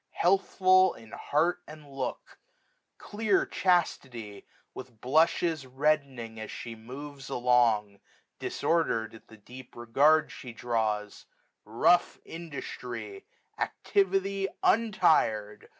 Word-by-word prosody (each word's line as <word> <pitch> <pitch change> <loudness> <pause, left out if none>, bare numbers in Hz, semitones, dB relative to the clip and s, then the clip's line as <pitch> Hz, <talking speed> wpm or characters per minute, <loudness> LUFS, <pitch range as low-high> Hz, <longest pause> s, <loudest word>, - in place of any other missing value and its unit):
Healthful 185 0 +3
in 115 -1 -15
heart 170 +4 0
and 155 -1 -12
look; 135 -1 -6 0.6
clear 225 - 0
Chastity, 130 - -1 0.3
With 125 -4 -11
blushes 160 +2 +1
reddening 130 -4 -1
as 110 - -7
(he 120 - -7
moves 135 +5 -10
along, 120 -5 +2
i6xo - - -36
Disordered 160 -10 0
at 110 - -15
the 110 - -15
deep 125 +4 -13
regard 145 +7 +3
she 125 -2 -9
draws; 110 -3 -2 0.4
Rough 120 +11 +2
Industry 125 -10 -7 0.3
j - - +3
Activity 195 0 0 0.2
untir'd. 155 - +2
130 Hz, 105 wpm, -28 LUFS, 115-170 Hz, 0.6 s, Healthful